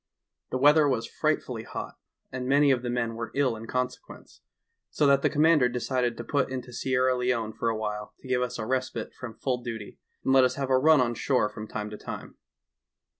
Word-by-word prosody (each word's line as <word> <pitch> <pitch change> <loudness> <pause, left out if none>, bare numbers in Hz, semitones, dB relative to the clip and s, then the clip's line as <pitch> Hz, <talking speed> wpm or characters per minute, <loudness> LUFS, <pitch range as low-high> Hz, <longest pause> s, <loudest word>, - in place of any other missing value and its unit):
The - - -1
weather 145 +3 +6
was 115 -3 0
frightfully - - -1
hot, - - -6 0.4
and 125 -1 -4
many 140 +1 +5
of 125 -2 +2
the 125 - -3
men 120 -1 -1
were 115 0 -5
ill 135 -4 +2
in 115 +1 -9
consequence, 125 - -5 0.5
so 150 - +1
that 140 -1 +5
the - - +3
com 150 0 +2
mander 155 -6 +5
decided 125 -1 -1
to - - -5
put 140 -3 0
into 125 -1 -6
Sierra 130 +1 +1
Leone 125 -3 -1
for 115 - -1
awhile 105 -1 -4
to - - -12
give 125 -1 +1
us 125 0 -2
a 110 - -4
respite 130 +2 -2
from 115 -4 -8
full 125 -1 -2
duty, 115 -4 -7 0.2
and 135 - +2
let 135 -1 +7
us 130 0 +2
have 135 -1 -2
a 130 - +5
run 155 0 +5
on 120 -1 +1
shore 120 -2 +1
from 105 0 -8
time 105 0 -5
to 105 - -8
time. - - -7
125 Hz, 215 wpm, -27 LUFS, 115-130 Hz, 0.5 s, let